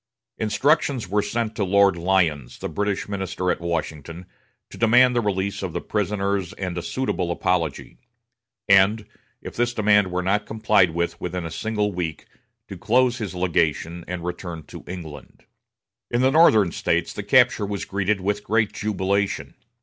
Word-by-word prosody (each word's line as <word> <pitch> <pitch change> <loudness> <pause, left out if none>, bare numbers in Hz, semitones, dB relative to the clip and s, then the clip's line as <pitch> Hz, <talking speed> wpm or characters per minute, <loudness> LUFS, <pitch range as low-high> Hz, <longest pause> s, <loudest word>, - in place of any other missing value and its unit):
Instructions 130 - +1
were 105 +3 +1
sent 110 +2 -2
to 105 - -1
Lord 100 0 +4
Lyons, 85 -7 0
the - - -5
British 100 -1 -2
minister 95 -2 -2
at - - -3
Washington, 85 0 -4 0.5
to - - -10
demand 125 +2 +5
the 120 - +2
release 100 -2 -2
of 95 -4 -4
the - - -2
prisoners 100 -3 -2
and 90 -3 -5
a 85 - -3
suitable 130 -5 -2
apology; 85 -3 -2 0.7
and, 100 +2 +4 0.4
if - - -8
this 120 0 0
demand 105 -3 +3
were 90 0 -1
not 105 +3 0
complied 110 -4 +3
with 85 +1 -3
within 90 -1 -4
a 80 - -5
single 105 +3 -1
week, 85 -4 -4 0.4
to - - -9
close 125 +1 +2
his 100 -5 -5
legation 85 -1 0
and 90 -1 -5
return 90 -2 -5
to - - -11
England. 85 -5 -9 0.6
In 120 - 0
the 130 +1 +4
Northern 110 - +5
States 85 0 -1
the - - -5
capture 120 0 +3
was 100 -1 -4
greeted 100 +1 -1
with 105 +2 -1
great 110 -1 +1
jubilation. 100 -1 -1
100 Hz, 160 wpm, -23 LUFS, 90-110 Hz, 0.7 s, demand